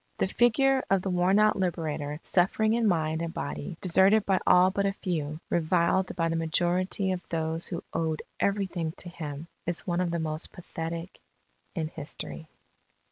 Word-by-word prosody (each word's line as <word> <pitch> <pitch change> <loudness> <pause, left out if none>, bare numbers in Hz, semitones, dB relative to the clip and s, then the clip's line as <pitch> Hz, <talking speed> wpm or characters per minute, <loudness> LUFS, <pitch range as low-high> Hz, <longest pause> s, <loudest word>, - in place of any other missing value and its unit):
"The - - +2
figure 260 +5 +3
of 195 -2 +2
the 190 - -1
worn 180 +2 +3
out 215 0 +4
Liberator, 155 -5 -2
suffering 215 +4 +2
in 230 -1 +2
mind 160 -3 +1
and 170 -1 -3
body, 170 0 -5
deserted 195 +4 +5
by 190 -2 +2
all 180 +1 +6
but 200 +1 +1
a 195 - 0
few, 155 -6 -3
reviled 175 +2 +2
by 165 -1 +1
the 165 - -1
majority 175 +4 0
of 185 -1 -2
those 160 0 -2
who 170 - -5
owed 160 -1 -1 0.2
everything 190 -5 0
to 175 - -8
him, 155 -2 -6 0.2
is 175 -1 -2
one 175 0 0
of 180 - 0
the 170 - -1
most 155 -1 -3
pathetic 165 0 -6 0.6
in 160 -3 -1
history." 160 +1 -7
175 Hz, 170 wpm, -28 LUFS, 160-190 Hz, 0.6 s, all